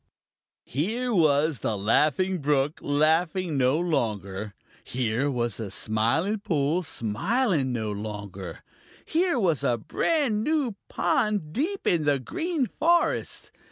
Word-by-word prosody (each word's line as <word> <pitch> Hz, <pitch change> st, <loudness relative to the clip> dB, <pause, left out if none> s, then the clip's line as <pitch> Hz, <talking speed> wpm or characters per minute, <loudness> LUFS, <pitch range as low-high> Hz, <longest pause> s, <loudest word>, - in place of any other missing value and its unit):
Here 230 Hz, -, -1 dB
was 155 Hz, -, +3 dB
the 105 Hz, +1 st, -1 dB
Laughing 155 Hz, -, +2 dB
Brook 145 Hz, 0 st, +1 dB
laughing 160 Hz, +3 st, +1 dB
no 130 Hz, +2 st, +3 dB
longer. 105 Hz, -, -2 dB, 0.3 s
Here 125 Hz, +2 st, -1 dB
was 120 Hz, -6 st, -1 dB
the 110 Hz, -3 st, -5 dB
Smiling 120 Hz, -, 0 dB
Pool 160 Hz, -2 st, 0 dB
smiling 160 Hz, -, 0 dB
no 110 Hz, -3 st, -2 dB
longer. 100 Hz, -4 st, -6 dB, 0.4 s
Here 340 Hz, -2 st, +1 dB
was 170 Hz, -, +1 dB
a 120 Hz, -, +2 dB
brand 235 Hz, -, 0 dB
new 295 Hz, -6 st, +1 dB, 0.2 s
pond 205 Hz, -8 st, 0 dB
deep 355 Hz, -, -2 dB
in 165 Hz, -4 st, +2 dB
the 145 Hz, -1 st, +3 dB
Green 330 Hz, -, -2 dB
Forest. 340 Hz, +8 st, 0 dB
150 Hz, 120 wpm, -26 LUFS, -, 0.4 s, was